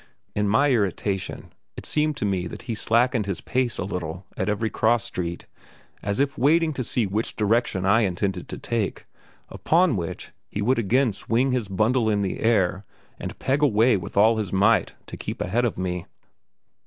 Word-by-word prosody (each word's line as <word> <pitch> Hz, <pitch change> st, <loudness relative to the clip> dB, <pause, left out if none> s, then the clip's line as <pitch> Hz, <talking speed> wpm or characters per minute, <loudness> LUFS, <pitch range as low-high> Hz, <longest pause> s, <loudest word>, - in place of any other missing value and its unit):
In 105 Hz, 0 st, 0 dB
my 140 Hz, +7 st, +4 dB
irritation 100 Hz, -3 st, -1 dB, 0.2 s
it -, -, -7 dB
seemed 150 Hz, -1 st, 0 dB
to -, -, -2 dB
me 95 Hz, -3 st, -1 dB
that -, -, -9 dB
he 115 Hz, -, -3 dB
slackened 115 Hz, +1 st, +1 dB
his 95 Hz, -4 st, -2 dB
pace 130 Hz, -2 st, -1 dB
a -, -, -2 dB
little 90 Hz, -1 st, -5 dB
at -, -, -1 dB
every 105 Hz, +2 st, -1 dB
cross 115 Hz, -1 st, +2 dB
street, 85 Hz, -1 st, -4 dB, 0.6 s
as 100 Hz, +3 st, -2 dB
if 140 Hz, 0 st, 0 dB
waiting 155 Hz, +4 st, +3 dB
to 130 Hz, -, -3 dB
see 120 Hz, -1 st, 0 dB
which 105 Hz, +4 st, -2 dB
direction 105 Hz, -3 st, +1 dB
I 105 Hz, +4 st, +4 dB
intended 95 Hz, -2 st, -2 dB
to -, -, -5 dB
take, 115 Hz, -4 st, -3 dB, 0.4 s
upon 170 Hz, -4 st, +2 dB
which 85 Hz, -4 st, -5 dB, 0.2 s
he -, -, -5 dB
would 115 Hz, +5 st, +2 dB
again 115 Hz, +2 st, +2 dB
swing 120 Hz, +7 st, 0 dB
his 125 Hz, -5 st, -1 dB
bundle 110 Hz, +4 st, +1 dB
in 105 Hz, -1 st, +1 dB
the 95 Hz, -, -3 dB
air 100 Hz, -4 st, +2 dB, 0.4 s
and -, -, -6 dB
peg 140 Hz, +2 st, 0 dB
away 120 Hz, -3 st, +4 dB
with 90 Hz, -1 st, -5 dB
all 110 Hz, +2 st, +5 dB
his 105 Hz, -5 st, -3 dB
might 100 Hz, +4 st, +3 dB
to -, -, -9 dB
keep -, -, -5 dB
ahead 120 Hz, +7 st, 0 dB
of 115 Hz, -, -2 dB
me. 90 Hz, -1 st, -3 dB
110 Hz, 185 wpm, -24 LUFS, 95-125 Hz, 0.6 s, all